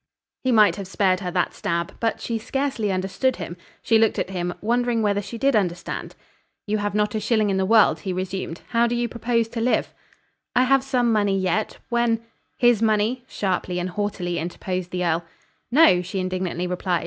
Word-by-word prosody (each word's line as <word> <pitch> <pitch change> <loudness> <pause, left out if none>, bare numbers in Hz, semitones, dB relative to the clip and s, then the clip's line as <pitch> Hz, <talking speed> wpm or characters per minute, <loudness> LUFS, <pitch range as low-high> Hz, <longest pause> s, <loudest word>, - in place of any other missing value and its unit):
He 260 - +2
might 210 -6 +5
have 200 -2 -6
spared 190 -1 +1
her 185 -2 -4
that 180 0 0
stab. 170 0 -2
But 225 -1 0
she 230 -1 -2
scarcely 250 -3 -1
understood 195 +8 0
him. 170 -1 -6 0.3
She 225 -1 +4
looked 225 -1 +3
at 190 - -2
him, 180 -1 -2
wondering 235 +1 +1
whether 205 -1 +1
she 220 +4 -7
did 270 +2 +2
understand. 180 -4 -2 0.5
"You 215 0 0
have 205 0 -2
not 210 0 +1
a 215 - 0
shilling 215 -1 +1
in 190 - 0
the 190 0 +1
world," 220 0 +5
he 190 - -4
resumed. 185 -2 -4
"How 235 0 +3
do 240 - -1
you 240 0 0
propose 230 0 0
to 230 0 -4
live?" 245 +2 +1 0.6
"I 250 - +5
have 270 +1 +3
some 250 -3 +1
money 205 -3 +2
yet. 185 +3 -1
When 235 -2 +1 0.2
" - - -46
"His 235 -3 +4
money?" 220 +3 +1
sharply 185 -4 -2
and 180 +1 -2
haughtily 180 -3 -2
interposed 180 +2 -4
the 180 0 -2
earl. 170 0 +1 0.5
"No," 245 - +6
she 185 +2 -5
indignantly 185 -1 -2
replied. 180 -1 -1
205 Hz, 195 wpm, -23 LUFS, 185-230 Hz, 0.6 s, No